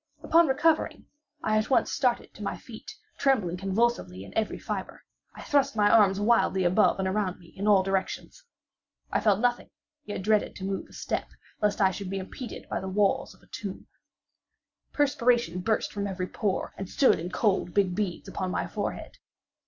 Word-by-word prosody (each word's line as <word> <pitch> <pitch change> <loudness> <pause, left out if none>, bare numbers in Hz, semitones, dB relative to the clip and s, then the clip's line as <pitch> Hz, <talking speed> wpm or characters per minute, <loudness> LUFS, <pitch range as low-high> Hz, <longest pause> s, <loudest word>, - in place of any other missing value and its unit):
Upon 335 0 +5
recovering, 310 +4 +1 0.4
I 215 0 +2
at 215 - -2
once 260 - +3
started 250 -4 0
to - - -13
my - - -3
feet, - - -11 0.2
trembling 220 -11 +2
convulsively 195 - 0
in 100 - -13
every 220 -1 0
fibre. - - -5 0.3
I - - -9
thrust 280 -3 +2
my 205 -1 +4
arms 200 -3 +5
wildly 205 -3 +3
above 185 +5 +3
and 190 -1 -1
around 190 -1 -1
me 170 -2 -17
in 200 +2 -3
all 200 -2 +6
directions. 195 - -3 0.7
I - - +2
felt 205 -3 +3
nothing; 245 +1 0 0.4
yet 205 -2 -5
dreaded 215 +1 +2
to 190 - -8
move 195 0 -3
a - - -17
step, - - -3 0.3
lest 210 0 +1
I 190 -1 +5
should 190 0 -6
be 195 - -3
impeded 205 +6 -7
by - - -2
the 190 - -5
walls 200 +1 +1
of - - -26
a - - -21
tomb. - - -6 1.1
Perspiration 245 - +2
burst 215 +4 0
from 200 -1 -2
every 185 -2 -3
pore, 195 +1 -2
and 195 -1 -5
stood 270 - +4
in 170 +2 -4
cold 190 -2 +1
big 195 -3 +3
beads 185 -2 -3
upon 185 -1 -3
my - - -1
forehead. - - -5
205 Hz, 185 wpm, -27 LUFS, 190-235 Hz, 1.1 s, all